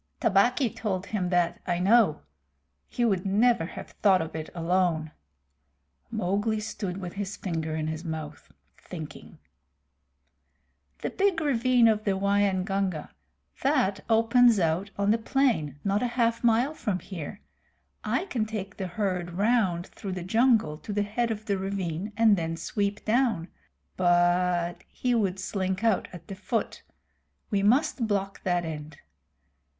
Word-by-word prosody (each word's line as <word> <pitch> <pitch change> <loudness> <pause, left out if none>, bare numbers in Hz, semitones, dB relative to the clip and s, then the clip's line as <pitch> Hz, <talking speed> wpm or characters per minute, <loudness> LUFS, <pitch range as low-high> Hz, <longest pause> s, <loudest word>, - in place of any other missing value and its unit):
"Tabaqui 230 +5 +3
told 195 -4 -2
him 190 -5 -2
that, 175 -1 +1
I 175 -1 +1
know. 200 -1 +4 0.7
He 240 - -1
would 195 -5 +1
never 205 -2 +2
have - - -9
thought 195 -3 +3
of 160 -1 -5
it 160 0 -5
alone." 170 -2 0 1.0
Mowgli 205 +4 0
stood 210 -4 -4
with 180 -3 -6
his 205 0 -4
finger 160 -4 -3
in 155 -1 -2
his 160 +1 -4
mouth, 155 -3 -6 0.3
thinking. - - -9 1.7
"The - - -1
big 390 -4 +1
ravine 255 -5 +3
of 215 -1 +2
the 195 -2 0
Waingunga. 195 -3 0 0.5
That 255 -8 +1
opens 230 0 +5
out 170 +3 0
on 200 +1 +2
the 225 - +2
plain 225 - +1
not 200 +1 +1
half 235 -2 +1
a - - +5
mile 240 +6 +2
from 205 -10 -2
here. 185 0 -7 0.6
I - - 0
can 230 - -2
take 200 -2 -5
the 190 - -3
herd 180 -2 -2
round 195 -3 +1
through 195 -2 -7
the 180 -1 -4
jungle 220 -6 +2
to - - -7
the 205 0 +1
head 230 +3 -1
of 215 -1 -4
the 200 -2 0
ravine 190 0 -3
and 225 -2 +6
then 165 -2 -3
sweep 200 +5 -2
down 225 -7 +1 0.5
but 175 -1 +2
he 250 -1 -1
would 200 -5 +1
slink 190 +1 -2
out 225 -4 +2
at 170 -2 -11
the - - -6
foot. 215 +4 -3 0.7
We 200 -2 +2
must 245 +3 +2
block 195 -2 -2
that 175 -2 0
end. 150 -1 -7
195 Hz, 145 wpm, -27 LUFS, 175-225 Hz, 1.7 s, and